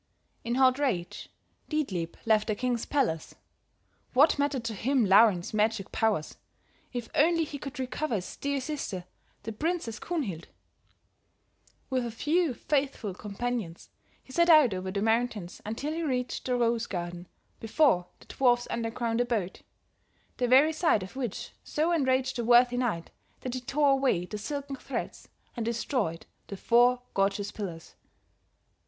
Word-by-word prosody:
"In 235 +1 -1
hot 260 0 +4
rage 205 -12 -2 0.4
Dietlieb 190 - -2
left 220 -1 +3
the 215 - 0
king's 245 +1 -1
palace; 230 - -1 0.8
what 285 +2 +5
mattered 285 -4 0
to 230 -1 -3
him 250 +3 +1
Laurin's 195 -2 +5
magic 215 -2 0
powers, 215 -9 0 0.5
if 245 -2 -4
only 330 +2 +3
he 290 -2 -6
could 275 +1 -7
recover 260 +1 -2
his 185 -3 -4
dear 280 0 -1
sister, 260 - -4 0.4
the 225 - -4
Princess 305 -1 -2
Kunhild? 230 - -3 1.4
"With 255 -1 +1
a 235 - -3
few 300 +5 0
faithful 270 -9 -1
companions 210 -2 -4 0.3
he 260 - -14
set 340 +2 +3
out 305 - +7
over 185 0 -4
the 200 +2 -2
mountains 225 -5 -1
until 275 +8 -3
he 330 - -3
reached 255 -5 -2
the 250 - +1
Rose 235 -1 +1
garden 175 -1 -5 0.3
before 225 - +2
the - - -17
dwarf's 245 -2 +2
underground 230 0 -1
abode, 220 -7 -2 0.8
the 250 - +1
very 275 +6 +6
sight 310 - +2
of 190 - -10
which 245 -6 -4
so 315 +3 0
enraged 260 -5 +1
the 240 - -1
worthy 245 +1 +5
knight 220 -10 -2 0.3
that 255 - -4
he 255 - -3
tore 280 +3 +2
away 265 -10 +2
the 210 +3 -6
silken 280 +3 -5
threads - - -5 0.3
and 235 - -3
destroyed 230 - -2 0.2
the 200 - -7
four 245 +3 +4
gorgeous 200 +1 0
pillars. 175 -6 -7
240 Hz, 150 wpm, -28 LUFS, 210-275 Hz, 1.4 s, out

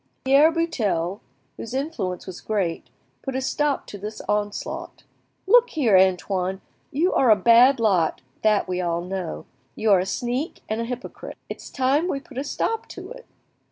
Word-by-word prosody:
Pierre 280 +4 +6
Buttel, 210 - -1 0.4
whose 235 +3 -6
influence 265 - -3
was 185 -2 -8
great, 190 -6 -2 0.3
put 270 -2 -5
a - - +1
stop 290 +1 0
to 205 - -9
this 210 +2 -6
onslaught. 205 0 -3 0.4
"Look 485 +4 +6
here, 250 - +2
Antoine, 190 0 +2 0.3
you 330 +7 +1
are 255 - +3
a 215 - +8
bad 235 +6 +6
lot, 190 -8 +2 0.2
that 215 -1 +2
we 185 0 -1
all 170 -1 -1
know; 180 -1 -5 0.3
you 220 -1 +1
are 195 - +6
a 185 - -2
sneak 245 - -3
and 220 +1 -2
a - - -2
hypocrite. 250 +1 -7
It's - - -7
time 275 +5 +1
we 275 - -1
put 270 -1 -8
a - - -2
stop 450 +9 -2
to - - -9
it. - - -11
225 Hz, 170 wpm, -24 LUFS, 190-280 Hz, 0.4 s, a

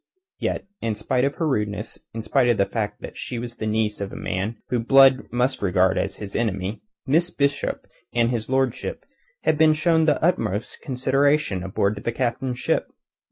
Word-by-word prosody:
Yet, - - -2 0.2
in 115 -2 -1
spite 125 +5 0
of 140 - -1
her 165 - -1
rudeness, 105 -5 -2
in 115 0 -5
spite 120 +2 +2
of 120 - +3
the 100 - +3
fact 105 -1 -3
that - - -7
she 120 - -4
was 120 0 -5
the 110 - -3
niece 105 -1 0
of 100 0 -3
a - - -8
man 100 +5 -3
whom 120 -2 0
Blood 135 +2 +5
must 125 +2 0
regard 95 -1 +2
as - - -2
his 100 -2 -7
enemy, 100 -2 -1 0.2
Miss 165 +5 +3
Bishop 140 -3 -1 0.3
and 120 0 +2
his 115 -2 -3
lordship 130 -2 -1 0.4
had 155 - +2
been 160 -1 +6
shown 160 0 +3
the 155 - +3
utmost 115 - 0
consideration 135 -4 +1
aboard 100 +2 -1
the 115 - 0
Captain's 125 +1 -2
ship. - - 0
120 Hz, 185 wpm, -24 LUFS, 105-135 Hz, 0.4 s, been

